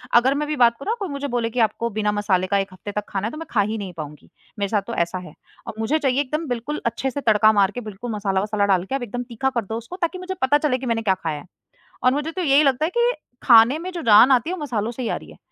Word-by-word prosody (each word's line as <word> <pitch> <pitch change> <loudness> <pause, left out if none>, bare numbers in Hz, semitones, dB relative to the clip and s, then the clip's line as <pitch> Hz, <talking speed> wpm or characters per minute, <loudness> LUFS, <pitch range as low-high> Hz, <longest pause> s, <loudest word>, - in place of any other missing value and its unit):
अगर 255 +3 +5
मैं 300 +1 -2
भी 305 - -2
बात 240 -2 +5
करूँ 275 - -5
ना 460 - +1
कोई 395 - -3
मुझे 285 0 -4
बोले 235 -2 -1
कि 245 +1 -4
आपको 230 +1 +1
बिना 210 0 -1
मसाले 200 -3 0
का 200 - +1
1 195 -1 -2
हफ़्ते 205 +2 -8
तक 210 0 -3
खाना 200 +2 -2
है, - - -5
तो 305 - -8
मैं 325 - -6
खा 210 - +3
ही 215 +2 -2
नहीं 190 -4 -6
पाऊँगी, 150 -1 -9 0.3
मेरे 200 -1 -1
साथ 210 -2 +1
तो 235 - -4
ऐसा 170 +2 -1
है। - - -13 0.3
और - - -5
मुझे 290 +8 +1
चाहिए 270 -1 +1
एकदम 305 +3 -3
बिल्कुल 245 +5 -3
अच्छे 260 +3 -1
से 285 - -4
तड़का 215 -2 +5
मार 200 -1 +3
के, 245 - -6
बिल्कुल 220 +2 -7
मसाला-वसाला 205 0 0
डाल 185 -3 +2
के, 265 - -3
अब 260 - -3
एकदम 245 +2 -4
तीखा 265 +3 -1
कर 235 -5 -2
दो 225 +3 -4
उसको 235 +10 -8
ताकि 340 +2 -1
मुझे 370 +1 -5
पता 275 +3 +4
चले 295 -4 0
कि 260 - -7
मैंने 230 -1 0
क्या 195 -4 +2
खाया 155 -2 -2
है। 145 - -13 0.6
और 255 - +5
मुझे 295 +3 -2
तो 370 - -4
यही 290 -1 +4
लगता 275 +2 +2
है - - -1
कि 480 +1 +4 0.3
खाने 235 +4 +6
में 370 +2 -5
जो 345 -2 -5
जान 230 +3 +7
आती 255 +5 +3
है - - -2
वो 325 - -9
मसालों 235 -5 -2
से 255 - -7
ही 230 - -2
आ - - 0
रही - - -13
है - - -15
235 Hz, 305 wpm, -22 LUFS, 210-280 Hz, 0.6 s, जान